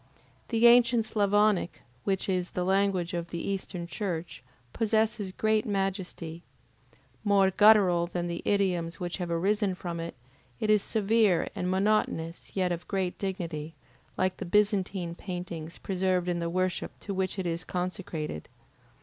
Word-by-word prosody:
The 230 0 +2
ancient 235 -1 +6
Sclavonic, 205 -3 +2 0.2
which 195 -1 0
is 180 -2 0
the 180 - -2
language 190 -1 +1
of 170 -1 -2
the 170 - -4
Eastern 190 -3 -3
Church, 175 - -4 0.3
possesses 220 -2 +1
great 215 +2 +1
majesty. 190 -4 -3 0.8
More 200 -2 +4
guttural 190 -4 +5
than 175 0 -3
the 170 -1 -3
idioms 180 -5 0
which 175 -1 -3
have 180 -2 -4
arisen 195 +3 +1
from 175 -2 -5
it, 165 0 -5 0.4
it 215 - +2
is 210 -1 +5
severe 215 -4 +2
and 180 - -2
monotonous 190 -4 0
yet 185 -2 +1
of 175 0 -4
great 190 -3 -2
dignity, 165 -5 -4 0.4
like 185 0 0
the - - -5
Byzantine 190 -2 +1
paintings 175 -3 -6
preserved 185 -1 0
in 175 -1 0
the 170 0 -2
worship 185 +1 -1
to 200 - -4
which 190 +1 -1
it 190 - -2
is 170 0 -2
consecrated. 180 - -4
185 Hz, 145 wpm, -29 LUFS, 175-205 Hz, 0.8 s, ancient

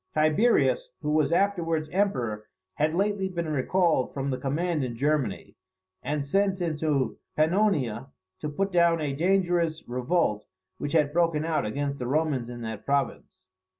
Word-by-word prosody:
Tiberius, 235 - +3
who 150 - 0
was 155 -1 +2
afterwards 170 -4 +1
emperor, 125 - -1 0.3
had 155 - 0
lately 195 0 0
been 170 -3 -3
recalled 155 0 +1
from 140 0 -2
the 130 - -1
command 155 +2 -1
in 120 -2 -3
Germany, 140 -5 -1 0.5
and 145 +1 -2
sent 195 +5 +1
into 155 -5 -1 0.2
Pannonia 155 - +1 0.3
to 150 - -3
put 195 +7 -1
down 170 -2 +4
a 145 -3 -2
dangerous 175 0 +1
revolt 125 -3 0 0.3
which 145 - -3
had 150 -3 +2
broken 165 -2 +2
out 160 -9 0
against 140 +5 -3
the 125 - -3
Romans 140 -4 0
in 120 -1 -7
that 110 -2 -5
province. 140 0 -2
155 Hz, 150 wpm, -27 LUFS, 135-175 Hz, 0.5 s, down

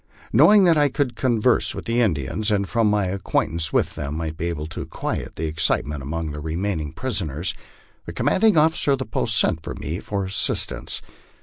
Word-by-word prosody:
Knowing 210 -1 +7
that 170 -4 +4
I 145 -1 +4
could 135 -2 -1
converse 120 -1 +2
with - - -7
the 115 +1 +1
Indians, 100 - 0
and 100 -2 +1
from 115 0 +1
my 105 -1 +1
acquaint 95 -2 -1
ance 80 -2 -1
with - - +1
them 75 0 -5
might 80 -1 -4
be 85 +2 -3
able 80 -3 -3
to 80 - -7
quiet - - -4
the 80 - -3
excitement 75 -2 -1
among 80 +3 -4
the 75 - -6
remaining 80 0 -3
prisoners, 90 - -2 0.5
the - - -4
commanding 215 -3 +2
officer 155 -2 +4
of - - +1
the 130 - -4
post 110 0 0
sent 80 -6 +3
to - - -6
me 80 +5 -5
for 100 -2 -3
assistance. 95 +1 0
95 Hz, 195 wpm, -22 LUFS, 80-120 Hz, 0.5 s, Knowing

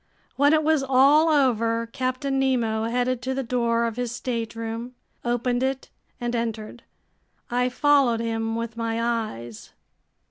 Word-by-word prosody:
When 285 +2 +4
it 310 0 +3
was 310 -1 +3
all 275 +4 +5
over, 230 -6 +2
Captain 255 +3 -2
Nemo 230 -5 +1
headed 245 +1 0
to 260 +1 -2
the 270 - -2
door 235 -1 +1
of 230 0 -3
his 245 -2 -2
stateroom, 230 0 -4 0.3
opened 245 +1 0
it, 265 0 -2 0.3
and 240 0 -2
entered. 230 0 -4 0.7
I 250 +1 +1
followed 270 -3 +3
him 225 -1 -2
with 230 0 -4
my 230 0 -2
eyes. 215 - -4
240 Hz, 140 wpm, -24 LUFS, 230-260 Hz, 0.7 s, all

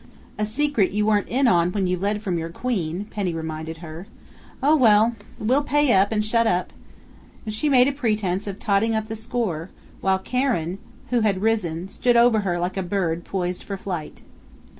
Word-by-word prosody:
"A 210 - 0
secret 235 -4 +1
you 210 0 +1
weren't 210 -1 +2
in 260 +2 +2
on 175 -3 +3
when 200 -2 0
you 180 0 +1
led 205 +3 -2
from 180 -5 -1
your 165 0 -4
Queen," 185 -3 -3
Penny 190 -5 -2
reminded 160 0 -5
her. 165 +4 -9 0.6
"Oh, 300 +3 +5
well! 225 -4 +5 0.2
We'll 255 +7 +2
pay 295 -2 +3
up 195 +2 +4
and 210 -1 0
shut 230 +1 +2
up!" 180 -3 0 0.7
and 215 - -4
she 295 +8 0
made 255 -2 +5
a - - +2
pretense 210 -8 -1
of 195 -1 -4
totting 215 +2 +1
up 220 0 -2
the 220 - -3
score, 215 -7 -3 0.3
while 190 0 +2
Karen, 195 -6 -1 0.3
who 245 - +3
had 205 -3 +1
risen, 185 -6 0
stood 240 +4 +1
over 235 -2 +5
her 185 -4 -1
like 180 +2 -2
a - - 0
bird 175 -3 -1
poised 180 -1 -3
for 200 - -6
flight. 180 -5 -6
205 Hz, 190 wpm, -23 LUFS, 180-230 Hz, 0.7 s, Oh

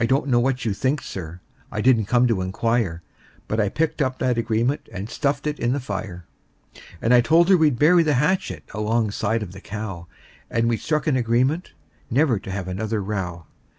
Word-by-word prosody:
I - - +2
don't 135 +3 +2
know 120 -2 +4
what 125 0 0
you'll 110 - +1
think, 130 +8 -1
Sir 90 -1 -7 0.3
I 105 - -3
didn't 115 -1 +4
come 125 +2 +3
to 115 -6 +1
inquire 95 -2 -1 0.4
But 110 - -1
I 105 -2 +2
picked 155 +6 -1
up 130 -1 0
that 125 -1 +1
agreement 115 +4 -1
and 100 +2 -5
stuffed 140 +3 -1
it 150 0 -2
in 120 +1 +1
the 140 - -1
fire; 100 -7 -6 0.8
And 115 - +4
I 120 - +7
told 165 +7 +4
her 190 - +7
we'd 150 -6 +3
bury 170 +6 +5
the 155 -3 +2
hatchet 135 - 0
alongside 110 0 0
of 90 - -8
the 95 +1 -11
cow; 100 -5 -6 0.4
And 115 0 +1
we 115 -1 +1
struck 155 +4 -1
an 150 -5 +2
agreement 125 +8 0 0.4
never 125 -3 +2
to 95 - -10
have 95 -1 -4
another 105 +4 -2
row. 95 -5 -4
115 Hz, 200 wpm, -23 LUFS, 100-135 Hz, 0.8 s, I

